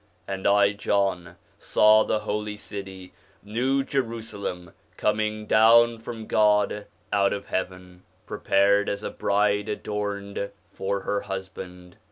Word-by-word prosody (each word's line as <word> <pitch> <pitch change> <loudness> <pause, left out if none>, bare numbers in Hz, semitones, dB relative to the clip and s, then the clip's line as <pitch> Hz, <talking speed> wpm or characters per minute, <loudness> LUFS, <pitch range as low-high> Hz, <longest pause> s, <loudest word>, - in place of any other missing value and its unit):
And 95 -1 -2
I 100 0 +5
John 100 -4 -1 0.2
saw 110 0 +5
the 110 - -1
holy 105 0 -3
city, 95 -3 -9 0.3
new 130 +6 0
Jerusalem, 115 - -4 0.2
coming 110 0 -1
down 115 +2 +5
from 115 -1 -7
God 105 -1 +2 0.3
out 100 -1 +3
of 100 0 -5
heaven, 90 -1 -5 0.2
prepared 100 +1 +2
as 100 +1 -3
a - - -4
bride 105 +1 +1
adorned 100 -1 -4 0.2
for 100 0 -2
her 100 +1 -1
husband. 95 -2 -8
100 Hz, 120 wpm, -25 LUFS, 95-105 Hz, 0.3 s, I